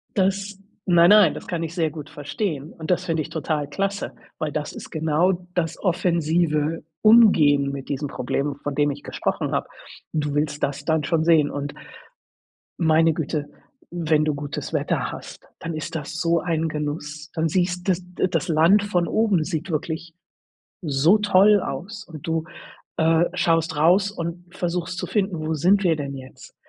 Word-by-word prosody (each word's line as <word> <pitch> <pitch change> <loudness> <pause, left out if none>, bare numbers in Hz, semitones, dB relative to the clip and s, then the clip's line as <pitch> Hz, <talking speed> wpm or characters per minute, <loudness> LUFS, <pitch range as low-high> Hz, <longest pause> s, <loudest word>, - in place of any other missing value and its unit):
Das 195 0 0 0.3
nein, 175 -2 +5
nein, 205 -6 +7
das - - -9
kann 170 -2 -2
ich 165 0 -5
sehr 165 -3 +1
gut 150 -2 -9
verstehen 145 +1 -4
und 160 - -8
das 180 0 +1
finde 165 -3 0
ich 155 - -6
total 155 -2 -2
klasse, 195 +1 -2 0.3
weil 155 -1 -2
das 150 0 -4
ist - - -9
genau 160 +4 +1 0.2
das 165 -3 -1
offensive 165 -3 +1 0.2
Umgehen 155 -12 +6
mit 135 -1 -7
diesem 145 +1 -2
Problem, 140 +2 -2
von 145 -1 -3
dem 145 0 +2
ich 140 +1 -8
gesprochen - - -2
habe. - - -1 0.5
Du 150 -2 -1
willst 150 0 -1
das 140 +1 -1
dann 160 -1 +1
schon 160 +1 +1
sehen 160 -3 +4
und 145 0 -4 1.1
meine 160 0 +4
Güte, 150 -2 -3 0.4
wenn 160 -3 +1
du 150 -2 0
gutes 145 0 -5
Wetter - - -1
hast, - - -10 0.2
dann 165 0 -5
ist 155 +1 -5
das 145 -3 -4
so 170 0 +2
ein 165 -2 -1
Genuss. 150 0 -5
Dann 160 0 0
sieht 180 +1 0
das, 185 -1 +2 0.2
äh - - +3
das 185 - -1
Land 170 +6 +4
von 180 -4 0
oben 210 -7 +2
sieht 170 +1 -4
wirklich 160 +2 -3 0.7
so 160 +5 +3
toll 205 0 +5
aus 205 +5 -6
und 155 -5 -10
du, 165 -1 -1 0.5
äh, 165 +1 +3
schaust 165 -2 +1
raus 180 +6 +4
und 175 0 -6
versuchst 175 0 -3
zu - - -3
finden, 195 -5 -1
wo 155 +1 -2
sind 190 +7 +3
wir 165 -4 +3
denn 140 -2 -5
jetzt? 130 -1 -12
165 Hz, 175 wpm, -23 LUFS, 150-180 Hz, 1.1 s, nein